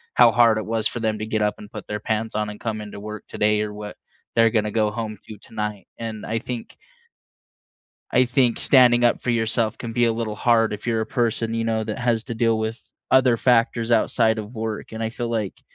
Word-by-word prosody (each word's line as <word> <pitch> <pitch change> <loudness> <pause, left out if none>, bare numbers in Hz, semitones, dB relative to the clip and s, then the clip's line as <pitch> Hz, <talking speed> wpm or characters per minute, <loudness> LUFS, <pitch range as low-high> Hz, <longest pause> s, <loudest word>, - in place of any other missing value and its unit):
how - - +7
hard 115 -2 +4
it 110 - -5
was 115 -1 +1
for 120 - -5
them 110 -1 0
to 110 - -3
get 110 -1 -1
up 105 0 +1
and 105 - -12
put - - -8
their 105 0 -3
pants 110 0 -2
on 105 0 -1
and 105 - -11
come 110 -2 -3
into 105 -1 -8
work 105 +1 -7
today 105 0 +1
or 105 -1 -3
what 105 0 -8 0.4
they're 115 0 +5
gonna 105 -2 +1
go 105 -1 +1
home 110 -2 -5
to 110 - -8
tonight. 105 -3 -5
And 110 -2 -5
I 115 +1 -1
think 120 0 -7 1.4
I 125 - +5
think 125 -1 +2
standing 120 -2 +5
up 120 - +3
for 125 - -1
yourself 115 -1 0
can 115 -1 -6
be 120 +1 +2
a 115 - +3
little 110 -2 -3
hard 115 0 +2
if 105 +3 -6
you're 115 -1 +1
a 110 - -2
person, 115 -1 -1
you 115 - -1
know, 110 -1 0
that - - -4
has 120 -2 0
to 120 - -5
deal 115 -1 +2
with 110 +1 -3 0.3
other 130 -2 +5
factors 115 -1 +2
outside 115 -1 +3
of 110 +3 -7
work, 110 0 -4
and 110 - -5
I 110 - -1
feel 120 0 -4
like 110 -4 -3
115 Hz, 230 wpm, -23 LUFS, 110-115 Hz, 1.4 s, how